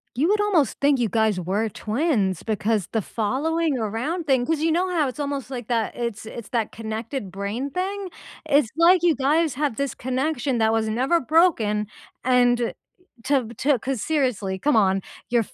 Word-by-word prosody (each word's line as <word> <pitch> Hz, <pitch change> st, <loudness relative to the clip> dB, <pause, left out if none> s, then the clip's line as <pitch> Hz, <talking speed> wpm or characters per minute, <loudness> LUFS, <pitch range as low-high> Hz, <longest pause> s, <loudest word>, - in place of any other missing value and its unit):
You 285 Hz, +7 st, +2 dB
would 415 Hz, +1 st, +3 dB
almost 350 Hz, -, +1 dB
think 280 Hz, -2 st, +3 dB
you 230 Hz, -, +1 dB
guys 220 Hz, -2 st, +1 dB
were 200 Hz, +6 st, -1 dB
twins, 215 Hz, -, -1 dB
because 215 Hz, -2 st, 0 dB
the 220 Hz, -, 0 dB
following 285 Hz, -, -1 dB
around 245 Hz, -, -2 dB
thing 260 Hz, -3 st, +3 dB
'cause 320 Hz, 0 st, 0 dB
you 325 Hz, 0 st, +2 dB
know 355 Hz, +3 st, +1 dB
how 310 Hz, -5 st, +2 dB
it's 255 Hz, +1 st, -7 dB
almost, 280 Hz, -2 st, -3 dB
like, 245 Hz, -4 st, -6 dB
that 230 Hz, -2 st, 0 dB
it's 235 Hz, -3 st, -4 dB
it's 230 Hz, 0 st, -8 dB
that 230 Hz, -3 st, -1 dB
connected 220 Hz, -1 st, -5 dB
brain 205 Hz, +8 st, -4 dB
thing? 385 Hz, +2 st, -3 dB, 0.4 s
It's 285 Hz, -6 st, +3 dB
like 345 Hz, +2 st, +6 dB
you 345 Hz, -3 st, +3 dB
guys 300 Hz, +2 st, +1 dB
have 290 Hz, -3 st, -1 dB
this 280 Hz, -1 st, -2 dB
connection 260 Hz, 0 st, -1 dB
that 220 Hz, 0 st, +3 dB
was 225 Hz, 0 st, +1 dB
never 260 Hz, +10 st, +2 dB
broken 240 Hz, -, +2 dB, 0.4 s
and 245 Hz, -1 st, +3 dB, 0.5 s
to 265 Hz, -3 st, +1 dB
to 280 Hz, -2 st, +2 dB
'cause 260 Hz, -1 st, -3 dB
seriously, 245 Hz, -11 st, -1 dB
come 290 Hz, +6 st, +2 dB
on, 195 Hz, -3 st, +3 dB, 0.3 s
you're 240 Hz, -1 st, +3 dB
f -, -, -19 dB
250 Hz, 180 wpm, -23 LUFS, 220-300 Hz, 0.5 s, like